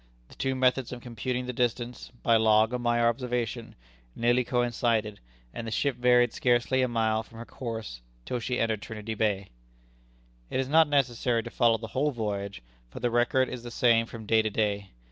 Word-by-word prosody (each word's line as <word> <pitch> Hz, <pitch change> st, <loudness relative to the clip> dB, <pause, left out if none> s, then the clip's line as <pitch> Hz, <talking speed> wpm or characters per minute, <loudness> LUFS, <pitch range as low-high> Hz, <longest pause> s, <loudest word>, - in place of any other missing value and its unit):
The -, -, -15 dB
two 135 Hz, 0 st, -1 dB
methods 130 Hz, -1 st, +1 dB
of 125 Hz, -, -6 dB
computing 125 Hz, +1 st, -4 dB
the 125 Hz, -, -4 dB
distance 120 Hz, 0 st, -2 dB
by 115 Hz, -, +4 dB
log 110 Hz, +1 st, +4 dB
and 125 Hz, -1 st, -2 dB
by 120 Hz, 0 st, +2 dB
observation 120 Hz, 0 st, -1 dB, 0.4 s
nearly 120 Hz, +2 st, +2 dB
coincided, 120 Hz, -3 st, 0 dB, 0.3 s
and 115 Hz, -, -6 dB
the -, -, -4 dB
ship 140 Hz, +4 st, 0 dB
varied 125 Hz, -1 st, +4 dB
scarcely 125 Hz, +1 st, +2 dB
a 130 Hz, -, +2 dB
mile 110 Hz, -2 st, +1 dB
from 115 Hz, 0 st, -15 dB
her 115 Hz, -, -7 dB
course 110 Hz, -, -6 dB, 0.2 s
till 125 Hz, -, -2 dB
she 125 Hz, +1 st, -2 dB
entered 110 Hz, -2 st, 0 dB
Trinity 110 Hz, 0 st, -6 dB
Bay. 100 Hz, -3 st, -1 dB, 1.0 s
It -, -, -1 dB
is 130 Hz, -, -1 dB
not 160 Hz, +2 st, +5 dB
necessary 125 Hz, -4 st, +1 dB
to 120 Hz, -, -8 dB
follow 115 Hz, -2 st, +3 dB
the 110 Hz, 0 st, -8 dB
whole 145 Hz, +3 st, +1 dB
voyage, 100 Hz, -, -4 dB, 0.3 s
for -, -, -9 dB
the 120 Hz, 0 st, 0 dB
record 120 Hz, +2 st, +2 dB
is 125 Hz, -, -6 dB
the 120 Hz, -, -8 dB
same 115 Hz, -1 st, +3 dB
from 115 Hz, -2 st, -9 dB
day 110 Hz, +1 st, +4 dB
to 110 Hz, -, -1 dB
day. 100 Hz, -2 st, -1 dB
120 Hz, 190 wpm, -28 LUFS, 110-125 Hz, 1.0 s, not